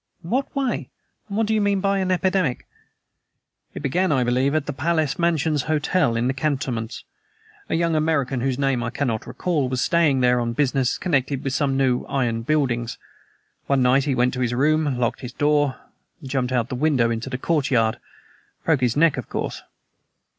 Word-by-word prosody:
"In 165 Hz, -, -8 dB
what 265 Hz, +4 st, -1 dB
way? 270 Hz, -3 st, -1 dB, 0.4 s
And 200 Hz, -, -3 dB
what 225 Hz, -, +2 dB
do 220 Hz, -, 0 dB
you 215 Hz, -, +2 dB
mean 200 Hz, -1 st, +2 dB
by 195 Hz, 0 st, +1 dB
an 190 Hz, -1 st, -1 dB
epidemic?" 185 Hz, -6 st, 0 dB, 1.1 s
"It -, -, -6 dB
began, 180 Hz, +7 st, +1 dB
I 130 Hz, -4 st, +2 dB
believe, 130 Hz, +4 st, +1 dB
at 155 Hz, -3 st, 0 dB
the 145 Hz, -, -4 dB
Palace 155 Hz, +1 st, 0 dB
Mansions 160 Hz, -3 st, +1 dB
Hotel, 155 Hz, -3 st, +1 dB
in 115 Hz, +1 st, 0 dB
the 130 Hz, -, +1 dB
cantonments. 130 Hz, -5 st, -2 dB, 0.7 s
A -, -, 0 dB
young 165 Hz, 0 st, +1 dB
American, 150 Hz, -5 st, 0 dB
whose 130 Hz, 0 st, 0 dB
name 135 Hz, -3 st, +1 dB
I 120 Hz, -, -2 dB
cannot 125 Hz, -4 st, -2 dB
recall, 150 Hz, -8 st, -1 dB
was 130 Hz, -1 st, -2 dB
staying 155 Hz, -6 st, +2 dB
there 125 Hz, 0 st, +3 dB
on 115 Hz, -1 st, -1 dB
business 135 Hz, -1 st, +1 dB
connected 140 Hz, -5 st, -1 dB
with 135 Hz, -2 st, -2 dB
some 135 Hz, -1 st, +1 dB
new 130 Hz, -2 st, +1 dB
iron 120 Hz, -4 st, -1 dB
buildings. 120 Hz, -4 st, 0 dB, 0.7 s
One 135 Hz, -2 st, +2 dB
night 130 Hz, +2 st, +3 dB
he 140 Hz, -3 st, 0 dB
went 125 Hz, 0 st, +2 dB
to 130 Hz, -, -4 dB
his 120 Hz, -1 st, 0 dB
room, 150 Hz, 0 st, +2 dB
locked 120 Hz, -1 st, -1 dB
the 125 Hz, -, -6 dB
door, 145 Hz, -2 st, +2 dB, 0.4 s
and 145 Hz, -, -10 dB
jumped 130 Hz, -1 st, -1 dB
out 125 Hz, -1 st, +2 dB
of -, -, -24 dB
the -, -, -3 dB
window 135 Hz, -7 st, +3 dB
into 115 Hz, +3 st, -3 dB
the 125 Hz, -, -3 dB
courtyard. 130 Hz, -7 st, +1 dB, 0.7 s
Broke 160 Hz, -5 st, +2 dB
his 125 Hz, +1 st, +1 dB
neck, 165 Hz, -1 st, +4 dB
of -, -, -6 dB
course." -, -, -4 dB
140 Hz, 195 wpm, -23 LUFS, 125-160 Hz, 1.1 s, neck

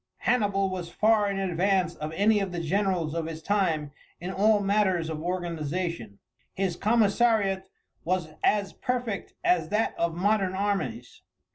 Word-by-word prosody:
Hannibal 205 Hz, -5 st, +2 dB
was 180 Hz, -2 st, -5 dB
far 215 Hz, +2 st, +3 dB
in 200 Hz, -, -2 dB
advance 185 Hz, -1 st, +1 dB
of 155 Hz, +1 st, -6 dB
any 205 Hz, +5 st, +3 dB
of 195 Hz, -2 st, -2 dB
the 175 Hz, -, -3 dB
generals 175 Hz, -2 st, 0 dB
of 165 Hz, -1 st, -2 dB
his 160 Hz, -1 st, -7 dB
time 165 Hz, -8 st, 0 dB, 0.3 s
in 180 Hz, +2 st, -5 dB
all 210 Hz, +2 st, +4 dB
matters 195 Hz, -5 st, +1 dB
of 155 Hz, -1 st, -5 dB
organization. 170 Hz, -, -3 dB, 0.4 s
His 190 Hz, -3 st, -1 dB
commissariat 210 Hz, -2 st, +2 dB, 0.3 s
was 180 Hz, -2 st, -1 dB
as 205 Hz, -2 st, +2 dB
perfect 245 Hz, -5 st, -3 dB
as 360 Hz, 0 st, +2 dB
that 215 Hz, +2 st, +1 dB
of 170 Hz, -1 st, 0 dB
modern 195 Hz, 0 st, +1 dB
armies. 190 Hz, -, -2 dB
190 Hz, 145 wpm, -27 LUFS, 170-205 Hz, 0.4 s, all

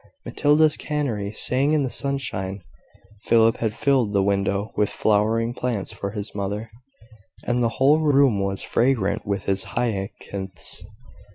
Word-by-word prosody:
Matilda's 150 Hz, +1 st, +3 dB
canary 125 Hz, -10 st, -2 dB
sang 130 Hz, +7 st, +1 dB
in 150 Hz, -2 st, +2 dB
the 130 Hz, -, -1 dB
sunshine; 100 Hz, -9 st, -3 dB, 0.6 s
Philip 115 Hz, -1 st, +4 dB
had 110 Hz, -1 st, -2 dB
filled 130 Hz, -7 st, +1 dB
the 100 Hz, -1 st, +3 dB
window 100 Hz, +1 st, 0 dB
with 105 Hz, -, +1 dB
flowering 110 Hz, +3 st, +1 dB
plants 120 Hz, -5 st, -3 dB
for 100 Hz, -, -4 dB
his 105 Hz, 0 st, -6 dB
mother, 105 Hz, +2 st, -4 dB, 0.7 s
and 120 Hz, 0 st, 0 dB
the 115 Hz, -, +2 dB
whole 140 Hz, +4 st, +5 dB
room 140 Hz, -8 st, +3 dB
was 100 Hz, 0 st, -1 dB
fragrant 120 Hz, -7 st, 0 dB
with 100 Hz, -1 st, -2 dB
his 95 Hz, -1 st, 0 dB
hyacinths. 95 Hz, -4 st, -3 dB
110 Hz, 140 wpm, -23 LUFS, 100-135 Hz, 0.7 s, whole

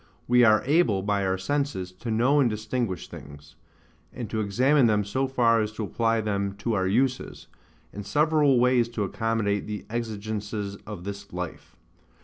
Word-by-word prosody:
We 125 Hz, 0 st, +5 dB
are 110 Hz, -2 st, +5 dB
able, 130 Hz, -, +2 dB
by 100 Hz, -1 st, 0 dB
our 95 Hz, 0 st, 0 dB
senses, 130 Hz, -4 st, -2 dB
to 120 Hz, -, -5 dB
know 125 Hz, +6 st, +3 dB
and 130 Hz, -4 st, +4 dB
distinguish 110 Hz, -3 st, -3 dB
things: 75 Hz, +1 st, -12 dB, 0.6 s
and 120 Hz, -, -6 dB
to 110 Hz, -, -1 dB
examine 125 Hz, +6 st, +3 dB
them 105 Hz, -2 st, +2 dB
so 130 Hz, +7 st, -1 dB
far 115 Hz, -3 st, +3 dB
as 105 Hz, 0 st, -2 dB
to 110 Hz, -, -4 dB
apply 115 Hz, +2 st, 0 dB
them 100 Hz, -2 st, -2 dB
to 115 Hz, -, -2 dB
our 95 Hz, -3 st, +1 dB
uses, 125 Hz, +6 st, -1 dB, 0.5 s
and 105 Hz, -, -6 dB
several 145 Hz, +4 st, +3 dB
ways 125 Hz, -1 st, +3 dB
to 105 Hz, -, +1 dB
accommodate 110 Hz, 0 st, -1 dB
the 105 Hz, -1 st, -5 dB
exigences 105 Hz, -3 st, -4 dB
of 105 Hz, -5 st, -7 dB
this 100 Hz, 0 st, -7 dB
life. 90 Hz, -1 st, -7 dB
110 Hz, 165 wpm, -26 LUFS, 100-125 Hz, 0.6 s, We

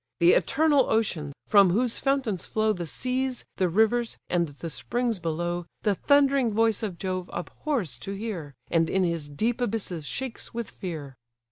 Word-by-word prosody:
The 170 Hz, 0 st, +7 dB
eternal 295 Hz, -3 st, +3 dB
ocean, 185 Hz, -10 st, 0 dB
from 200 Hz, -3 st, +6 dB
whose 230 Hz, +6 st, +1 dB
fountains 270 Hz, -9 st, 0 dB
flow 215 Hz, 0 st, +1 dB
The 175 Hz, -4 st, -5 dB
seas, 255 Hz, -, -2 dB
the 185 Hz, -2 st, +2 dB
rivers, 225 Hz, +5 st, +2 dB
and 170 Hz, -1 st, +2 dB
the 145 Hz, +3 st, -7 dB
springs 235 Hz, -, -1 dB
below, 175 Hz, +1 st, -2 dB, 0.2 s
The 210 Hz, -, +3 dB
thundering 275 Hz, +1 st, +3 dB
voice 225 Hz, 0 st, +2 dB
of 200 Hz, -6 st, -3 dB
Jove 185 Hz, -1 st, -3 dB
abhors 185 Hz, -, -3 dB
to 195 Hz, -, -5 dB
hear, 195 Hz, -9 st, -5 dB, 0.2 s
And 165 Hz, -1 st, +3 dB
in 190 Hz, 0 st, +2 dB
his 165 Hz, -4 st, -1 dB
deep 225 Hz, -, -1 dB
abysses 195 Hz, -9 st, -2 dB
shakes 260 Hz, -3 st, -5 dB
with 235 Hz, -1 st, -4 dB
fear." 155 Hz, -7 st, -6 dB
205 Hz, 160 wpm, -27 LUFS, 170-240 Hz, 0.2 s, The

